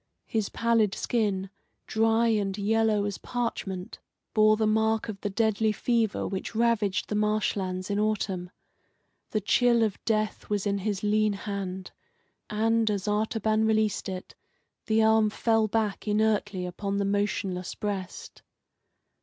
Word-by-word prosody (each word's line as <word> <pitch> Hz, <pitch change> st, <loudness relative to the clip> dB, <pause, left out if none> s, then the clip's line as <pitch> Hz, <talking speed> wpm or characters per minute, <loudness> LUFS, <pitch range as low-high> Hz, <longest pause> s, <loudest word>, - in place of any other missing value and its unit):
His 220 Hz, -3 st, -1 dB
pallid 230 Hz, -4 st, +2 dB
skin, 200 Hz, -5 st, -1 dB, 0.3 s
dry 225 Hz, +1 st, +2 dB
and 200 Hz, -3 st, 0 dB
yellow 215 Hz, 0 st, +2 dB
as 205 Hz, -1 st, -4 dB
parchment, 195 Hz, -6 st, -4 dB, 0.3 s
bore 215 Hz, 0 st, +5 dB
the 220 Hz, -, +1 dB
mark 220 Hz, +1 st, +1 dB
of 195 Hz, -3 st, -6 dB
the 205 Hz, -, -2 dB
deadly 220 Hz, +1 st, +1 dB
fever 225 Hz, 0 st, 0 dB
which 195 Hz, +3 st, -5 dB
ravaged 220 Hz, -4 st, +1 dB
the -, -, -4 dB
marsh 210 Hz, 0 st, +1 dB
lands 185 Hz, -1 st, -3 dB
in 200 Hz, -, 0 dB
autumn. 200 Hz, -4 st, -1 dB, 0.8 s
The 215 Hz, -, -1 dB
chill 235 Hz, +3 st, +3 dB
of 215 Hz, -3 st, -2 dB
death 215 Hz, -1 st, -1 dB
was 205 Hz, -1 st, -1 dB
in 200 Hz, -1 st, 0 dB
his 200 Hz, 0 st, -2 dB
lean 210 Hz, 0 st, +2 dB
hand, 195 Hz, -2 st, -5 dB, 0.6 s
and, 225 Hz, +1 st, +2 dB
as 205 Hz, -1 st, -2 dB
Artaban 215 Hz, +1 st, +1 dB
released 215 Hz, -2 st, +1 dB
it, 185 Hz, -1 st, -6 dB, 0.5 s
the 220 Hz, 0 st, +3 dB
arm 220 Hz, -1 st, +4 dB
fell 225 Hz, 0 st, +1 dB
back 215 Hz, -1 st, -1 dB
inertly 210 Hz, -3 st, +1 dB
upon 195 Hz, +3 st, -3 dB
the 200 Hz, -, 0 dB
motionless 195 Hz, -2 st, -1 dB
breast. 200 Hz, -3 st, -5 dB
210 Hz, 140 wpm, -27 LUFS, 200-220 Hz, 0.8 s, bore